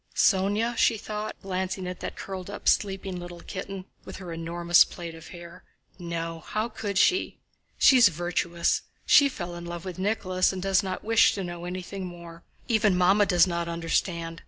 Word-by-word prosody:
"Sónya?" 205 Hz, +4 st, +2 dB
she 225 Hz, -, +4 dB
thought, 215 Hz, 0 st, -5 dB
glancing 190 Hz, 0 st, -3 dB
at 180 Hz, 0 st, -6 dB
that -, -, -5 dB
curled 190 Hz, -1 st, -7 dB
up, 205 Hz, -, -7 dB
sleeping 195 Hz, -2 st, +1 dB
little 175 Hz, -1 st, -9 dB
kitten 195 Hz, -1 st, -7 dB, 0.2 s
with -, -, -9 dB
her 180 Hz, -3 st, -7 dB
enormous 170 Hz, +1 st, +3 dB
plait 170 Hz, -2 st, -8 dB
of 165 Hz, -1 st, -12 dB
hair. 170 Hz, -1 st, -11 dB, 0.4 s
"No, 165 Hz, -1 st, -4 dB
how 215 Hz, +7 st, -3 dB
could 205 Hz, -3 st, -4 dB
she? 365 Hz, -, +2 dB, 0.4 s
She's 255 Hz, -4 st, +7 dB
virtuous. 170 Hz, 0 st, 0 dB, 0.2 s
She 285 Hz, -1 st, +6 dB
fell 175 Hz, -8 st, -6 dB
in 175 Hz, 0 st, -7 dB
love 170 Hz, +1 st, -6 dB
with 185 Hz, -1 st, -6 dB
Nicholas 185 Hz, -2 st, +1 dB
and 190 Hz, -, -5 dB
does 195 Hz, +1 st, +2 dB
not 185 Hz, -2 st, -5 dB
wish 225 Hz, 0 st, +4 dB
to 195 Hz, -, -3 dB
know 175 Hz, -1 st, -6 dB
anything 185 Hz, +1 st, -5 dB
more. 170 Hz, -1 st, -11 dB, 0.3 s
Even 215 Hz, -5 st, +3 dB
Mamma 195 Hz, +3 st, +4 dB
does 175 Hz, -1 st, +5 dB
not 170 Hz, -2 st, -2 dB
understand. 170 Hz, 0 st, -2 dB
185 Hz, 175 wpm, -26 LUFS, 170-195 Hz, 0.4 s, She's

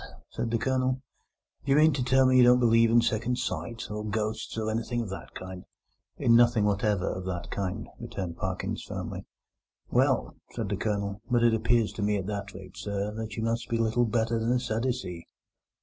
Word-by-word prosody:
said 115 Hz, -, -3 dB
the 115 Hz, -, +1 dB
Colonel, 130 Hz, +1 st, 0 dB, 0.6 s
"do 140 Hz, -, -1 dB
you -, -, +6 dB
mean 155 Hz, +1 st, +6 dB
to 130 Hz, -1 st, -1 dB
tell 130 Hz, +1 st, +4 dB
me 130 Hz, 0 st, +4 dB
you 125 Hz, -, +8 dB
don't 125 Hz, +1 st, +6 dB
believe 115 Hz, -1 st, +5 dB
in 115 Hz, +1 st, +5 dB
second 120 Hz, +2 st, 0 dB
sight, 115 Hz, -2 st, -3 dB
or 105 Hz, 0 st, -4 dB
ghosts, 110 Hz, +1 st, -3 dB
or 110 Hz, 0 st, -1 dB
anything 115 Hz, +2 st, -2 dB
of 110 Hz, -, -5 dB
that 95 Hz, -, -8 dB
kind?" 95 Hz, 0 st, -7 dB, 0.5 s
"In 115 Hz, -, +4 dB
nothing 120 Hz, -3 st, +5 dB
whatever 105 Hz, -2 st, +1 dB
of 95 Hz, -, -3 dB
that 90 Hz, -2 st, -4 dB
kind," 95 Hz, -2 st, -3 dB
returned 90 Hz, -3 st, -5 dB
Parkins 95 Hz, -1 st, -3 dB
firmly. -, -, -6 dB, 0.6 s
"Well," -, -, +2 dB, 0.2 s
said -, -, -3 dB
the -, -, 0 dB
Colonel, 100 Hz, -1 st, -2 dB
"but 120 Hz, -2 st, +3 dB
it 120 Hz, -1 st, +5 dB
appears 115 Hz, 0 st, +2 dB
to -, -, -5 dB
me 105 Hz, 0 st, +1 dB
at 95 Hz, -, -3 dB
that 100 Hz, -1 st, -4 dB
rate, 95 Hz, -1 st, -11 dB
sir, 100 Hz, 0 st, -3 dB
that 110 Hz, -1 st, -5 dB
you 110 Hz, -, -3 dB
must 115 Hz, +1 st, -1 dB
be 115 Hz, -, +1 dB
little 115 Hz, +1 st, +2 dB
better 115 Hz, +1 st, 0 dB
than 115 Hz, +2 st, 0 dB
a 125 Hz, -, +2 dB
Sadducee." 115 Hz, -7 st, -3 dB
110 Hz, 200 wpm, -28 LUFS, 100-120 Hz, 0.6 s, you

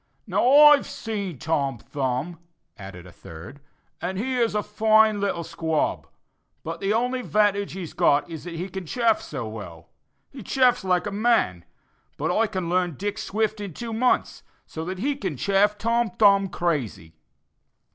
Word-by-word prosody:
"Now, -, -, 0 dB
I've 295 Hz, 0 st, +7 dB
seen 200 Hz, -, -5 dB
Tom 140 Hz, -3 st, -1 dB
Thumb," 135 Hz, +7 st, -3 dB, 0.4 s
added 95 Hz, -4 st, -10 dB
a 90 Hz, -, -13 dB
third, 85 Hz, -, -12 dB, 0.4 s
"and 185 Hz, +2 st, -3 dB
he 255 Hz, +6 st, -2 dB
is 230 Hz, -3 st, +1 dB
a 210 Hz, -, 0 dB
fine 215 Hz, 0 st, +3 dB
little 190 Hz, -4 st, -1 dB
squab, 160 Hz, -1 st, -2 dB, 0.6 s
but 165 Hz, +1 st, -5 dB
the 195 Hz, +2 st, -1 dB
only 250 Hz, +3 st, 0 dB
'vantage 205 Hz, -3 st, +1 dB
he's 180 Hz, -4 st, -7 dB
got 145 Hz, +1 st, +2 dB
is 165 Hz, -1 st, -8 dB
he 175 Hz, +1 st, -5 dB
can 190 Hz, -2 st, -7 dB
chaff 230 Hz, +3 st, +1 dB
so 135 Hz, -6 st, -6 dB
well. 100 Hz, -7 st, -9 dB, 0.4 s
He 265 Hz, -, -10 dB
chaffs 250 Hz, +2 st, +2 dB
like 180 Hz, -2 st, +1 dB
a 205 Hz, -, -3 dB
man; 200 Hz, -, +1 dB, 0.5 s
but -, -, -1 dB
I 225 Hz, +1 st, +2 dB
can 185 Hz, -5 st, -4 dB
learn 175 Hz, -2 st, 0 dB
Dick 205 Hz, +6 st, -4 dB
Swift 215 Hz, 0 st, -2 dB
in 195 Hz, -6 st, -7 dB
two 230 Hz, -1 st, -6 dB
months, 250 Hz, +3 st, 0 dB, 0.2 s
so 160 Hz, -, -7 dB
that 185 Hz, +2 st, -5 dB
he 280 Hz, +9 st, -1 dB
can 190 Hz, -, -4 dB
chaff 200 Hz, +5 st, +2 dB
Tom 230 Hz, +2 st, 0 dB
Thumb 200 Hz, 0 st, +4 dB
crazy." 135 Hz, -, -3 dB
195 Hz, 165 wpm, -24 LUFS, 160-220 Hz, 0.6 s, I've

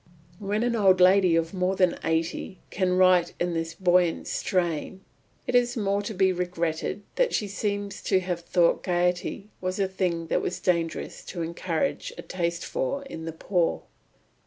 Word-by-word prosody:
When 210 Hz, +2 st, -1 dB
an 240 Hz, -1 st, +1 dB
old 190 Hz, -4 st, +4 dB
lady 185 Hz, -1 st, +6 dB
of 165 Hz, +1 st, 0 dB
more 185 Hz, 0 st, 0 dB
than 185 Hz, -2 st, +3 dB
eighty 165 Hz, +3 st, -1 dB
can 185 Hz, -1 st, +1 dB
write 185 Hz, -2 st, +4 dB
in 175 Hz, 0 st, 0 dB
this 165 Hz, 0 st, -3 dB
buoyant 180 Hz, -2 st, +2 dB
strain, 180 Hz, +1 st, -1 dB, 0.4 s
it -, -, -3 dB
is 245 Hz, 0 st, +3 dB
the 230 Hz, -, -2 dB
more 200 Hz, 0 st, +1 dB
to 205 Hz, +1 st, -5 dB
be 190 Hz, 0 st, +3 dB
regretted 175 Hz, +1 st, -2 dB
that -, -, +2 dB
she 210 Hz, -, -1 dB
seemed 200 Hz, 0 st, -2 dB
to 190 Hz, -, +3 dB
have 180 Hz, -2 st, -3 dB
thought 170 Hz, 0 st, +2 dB
gaiety 180 Hz, +3 st, -1 dB
was 185 Hz, 0 st, -2 dB
a 195 Hz, -, +2 dB
thing 180 Hz, -3 st, -1 dB
it -, -, +2 dB
was 175 Hz, -, -3 dB
dangerous 170 Hz, -3 st, -1 dB
to 175 Hz, -3 st, -4 dB
encourage 170 Hz, -, -2 dB
a -, -, -7 dB
taste 170 Hz, -2 st, -2 dB
for 480 Hz, -, -2 dB
in 165 Hz, -12 st, -8 dB
the 165 Hz, -, -3 dB
poor. 170 Hz, +1 st, 0 dB
180 Hz, 175 wpm, -26 LUFS, 170-200 Hz, 0.4 s, lady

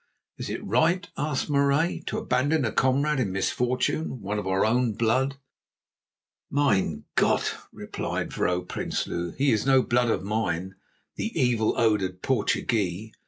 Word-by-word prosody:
"Is -, -, -4 dB
it -, -, -4 dB
right," 170 Hz, -, +2 dB
asked 145 Hz, -2 st, -1 dB
Marais, 140 Hz, +3 st, +2 dB
"to -, -, -2 dB
abandon 135 Hz, +3 st, +1 dB
a 110 Hz, -, 0 dB
comrade 140 Hz, +3 st, +2 dB
in 110 Hz, -7 st, 0 dB
misfortune, 125 Hz, +8 st, -1 dB
one 105 Hz, +1 st, -3 dB
of 100 Hz, -, -5 dB
our 95 Hz, +1 st, +2 dB
own 120 Hz, +1 st, +2 dB
blood?" 130 Hz, +6 st, +1 dB, 1.1 s
"Mein 95 Hz, -, +1 dB
Gott!" -, -, +2 dB, 0.2 s
replied -, -, -4 dB
Vrouw 90 Hz, 0 st, 0 dB
Prinsloo; 85 Hz, -1 st, -3 dB
"he 140 Hz, +1 st, +3 dB
is 110 Hz, -, +2 dB
no 135 Hz, -1 st, +5 dB
blood 120 Hz, 0 st, +2 dB
of 110 Hz, -, 0 dB
mine, 95 Hz, -3 st, -2 dB, 0.4 s
the 225 Hz, -, -2 dB
evil 120 Hz, -4 st, +2 dB
odoured 100 Hz, -5 st, +1 dB
Portuguee. 110 Hz, -4 st, 0 dB
120 Hz, 140 wpm, -26 LUFS, 100-135 Hz, 1.1 s, no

